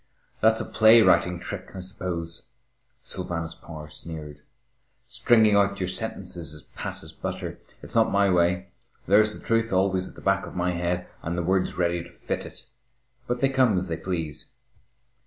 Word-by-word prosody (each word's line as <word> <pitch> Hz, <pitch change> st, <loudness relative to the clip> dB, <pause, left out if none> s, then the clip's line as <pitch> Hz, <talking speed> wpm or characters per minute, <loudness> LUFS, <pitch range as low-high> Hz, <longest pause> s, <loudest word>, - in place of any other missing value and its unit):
"That's 110 Hz, 0 st, +4 dB
a -, -, -2 dB
play 110 Hz, +1 st, +6 dB
writing 90 Hz, -1 st, +3 dB
trick, 95 Hz, +1 st, -7 dB
I -, -, -5 dB
suppose," 85 Hz, -2 st, -4 dB, 0.6 s
Sylvanus 85 Hz, -1 st, -4 dB
Power 80 Hz, -2 st, -10 dB
sneered, 75 Hz, -1 st, -8 dB, 0.6 s
"stringing 120 Hz, -3 st, +4 dB
out 100 Hz, 0 st, +3 dB
your 90 Hz, -1 st, -1 dB
sentences 90 Hz, -6 st, -3 dB
as 75 Hz, -, -12 dB
pat -, -, -5 dB
as -, -, -10 dB
butter. -, -, -5 dB, 0.2 s
It's -, -, -6 dB
not 115 Hz, -1 st, +4 dB
my 100 Hz, 0 st, +4 dB
way. 90 Hz, +2 st, +2 dB, 0.4 s
There's 105 Hz, +2 st, +4 dB
the -, -, -16 dB
truth 115 Hz, 0 st, +1 dB
always 95 Hz, 0 st, +1 dB
at -, -, -15 dB
the -, -, -12 dB
back 100 Hz, 0 st, +1 dB
of -, -, -10 dB
my 90 Hz, 0 st, +1 dB
head, 90 Hz, +1 st, -1 dB
and 85 Hz, +2 st, -3 dB
the 90 Hz, -, 0 dB
words 95 Hz, +2 st, +1 dB
ready 85 Hz, -1 st, +1 dB
to 85 Hz, -, -11 dB
fit 85 Hz, -, -4 dB
it, -, -, -11 dB, 0.6 s
but 125 Hz, 0 st, -2 dB
they 135 Hz, -, +4 dB
come 130 Hz, -7 st, +3 dB
as 90 Hz, 0 st, -2 dB
they 80 Hz, -, -2 dB
please." 80 Hz, -4 st, -4 dB
90 Hz, 175 wpm, -26 LUFS, 85-100 Hz, 0.6 s, play